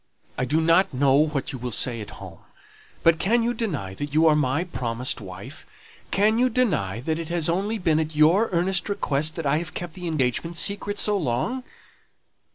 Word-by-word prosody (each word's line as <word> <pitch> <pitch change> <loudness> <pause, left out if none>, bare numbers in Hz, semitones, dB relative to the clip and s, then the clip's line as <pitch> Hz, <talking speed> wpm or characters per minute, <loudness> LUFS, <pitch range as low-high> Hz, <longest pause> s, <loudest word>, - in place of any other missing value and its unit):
"I 125 - -1
do 150 +5 +1
not 165 -1 +3
know 135 +1 +3
what 150 -1 +1
you 130 - -7
will 125 +1 -4
say 120 0 +1
at 105 - -8
home; 95 -4 -11 0.6
but 165 -1 +4
can 230 +4 +2
you 240 +1 0
deny 155 - -3
that 145 +7 -6
you 160 +1 +5
are 155 -2 +5
my 145 +2 +1
promised 125 -7 -3
wife? 100 +9 -10 0.5
Can 215 +3 +2
you 255 +1 +3
deny 150 - 0
that 160 +4 -2
it 165 -1 -6
has 170 -2 0
only 195 +6 0
been 165 -5 +1
at 155 0 -3
your 170 +9 +4
earnest 180 +2 +1
request 155 -6 0
that 165 - -5
I 140 +2 +2
have 170 +1 -7
kept 175 -2 -5
the 180 -2 -6
engagement 155 +2 -1
secret 205 +1 0
so 210 0 +2
long?" 190 - -1
160 Hz, 195 wpm, -24 LUFS, 130-190 Hz, 0.6 s, you